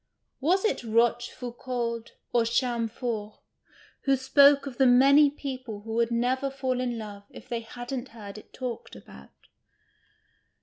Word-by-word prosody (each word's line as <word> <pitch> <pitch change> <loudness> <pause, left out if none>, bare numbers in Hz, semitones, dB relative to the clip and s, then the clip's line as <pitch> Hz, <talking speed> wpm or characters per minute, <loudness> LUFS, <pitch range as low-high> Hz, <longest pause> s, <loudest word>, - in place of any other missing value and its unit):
Was 365 +9 +2
it 435 - +1
Rochefoucauld 235 +1 -1 0.2
or 240 -1 +4
Chamfort 230 -2 -1 0.7
who 275 -1 +4
spoke 280 +2 +5
of 265 -4 -8
the 265 - +6
many 275 +4 +6
people 255 -7 -6
who 220 +1 -7
would 230 0 +2
never 250 +3 0
fall 260 -2 -2
in 245 -2 -2
love 205 -2 -8
if - - -13
they 235 - -2
hadn't 245 +3 -6
heard 210 -2 -9
it - - -19
talked 250 -3 -6
about 65 0 -14
245 Hz, 135 wpm, -27 LUFS, 230-265 Hz, 0.7 s, the